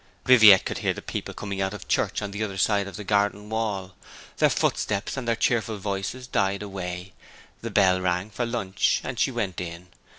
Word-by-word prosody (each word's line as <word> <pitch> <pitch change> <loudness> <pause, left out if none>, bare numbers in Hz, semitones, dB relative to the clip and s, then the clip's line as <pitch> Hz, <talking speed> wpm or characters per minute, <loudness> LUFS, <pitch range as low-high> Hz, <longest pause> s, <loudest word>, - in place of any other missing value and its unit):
Viviette 110 -7 +8
could - - -3
hear - - 0
the - - -7
people - - -5
coming 100 -2 -5
out 95 +2 -1
of 95 - -10
church - - 0
on 100 - -4
the 105 +2 -3
other 100 -3 -4
side 100 0 +2
of 100 - -8
the 105 - -6
garden 105 +1 0
wall. 100 -4 -2 0.4
Their - - +4
footsteps 105 0 -1
and 130 -3 -5
their 115 - +2
cheerful 115 -1 0
voices 100 +5 -4
died 100 -4 0
away; 90 -2 -6 0.5
the 115 - -4
bell 95 -3 +3
rang 90 +3 -1
for 120 +4 -2
lunch; 100 -6 0
and 125 -2 -5
she - - +3
went 105 -8 -3
in. 85 +1 -7
100 Hz, 200 wpm, -25 LUFS, 95-110 Hz, 0.5 s, Viviette